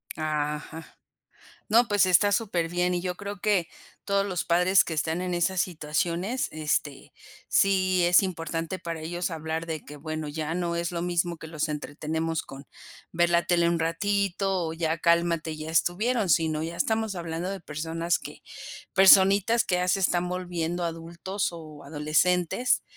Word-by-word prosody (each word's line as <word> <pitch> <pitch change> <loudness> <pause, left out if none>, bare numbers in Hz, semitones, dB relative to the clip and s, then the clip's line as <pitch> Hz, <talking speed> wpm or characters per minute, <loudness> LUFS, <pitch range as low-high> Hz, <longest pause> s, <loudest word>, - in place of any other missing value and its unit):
Ajá. 155 +1 -4 0.7
No, 230 +3 +5
pues, 205 -2 +3
está 185 +3 +4
superbién 180 -4 0
y 175 - -1
yo 180 -1 -3
creo 200 0 -7
que 190 -4 +1 0.4
todos 200 0 +1
los 185 -4 -2
padres 180 +2 +4
que 165 - -4
están 160 +3 -1
en 180 -1 -2
esas 175 +1 +1
situaciones, 175 +7 -2
este, 150 -2 -2 0.4
sí 185 -2 +3
es 175 +2 +6
importante, 165 -1 -3
para 165 -1 -5
ellos, 175 +2 -3
hablar 160 +1 -4
de 160 -2 -4
que, 150 - -10
bueno, 155 +1 -5
ya 155 +2 -3
no 170 -1 -1
es 170 0 -2
lo 170 -1 -3
mismo 175 -1 -1
que 160 - -9
los 155 -2 -2
entretenemos 155 +2 -3
con 135 0 -11 0.4
ver 175 +1 +2
la 170 0 +3
tele 170 -1 +3
un 170 -1 0
ratito 195 +1 0
o 160 - -4
ya 165 0 -1
cálmate, 170 -2 +1
ya 155 +1 -6
estuvieron, 205 +6 +1
sino 160 -2 +2
ya 165 +1 -5
estamos 220 0 0
hablando 170 +1 -4
de 195 -2 -5
personas 165 +2 -2
que - - -10 0.5
personitas 195 +4 +6
que 180 - 0
ya 180 0 0
se 185 - +3
están 180 -1 +1
volviendo 175 -1 -3
adultos 170 +4 -3
o 155 -3 -10
adolescentes 165 - +1
170 Hz, 160 wpm, -26 LUFS, 160-185 Hz, 0.7 s, es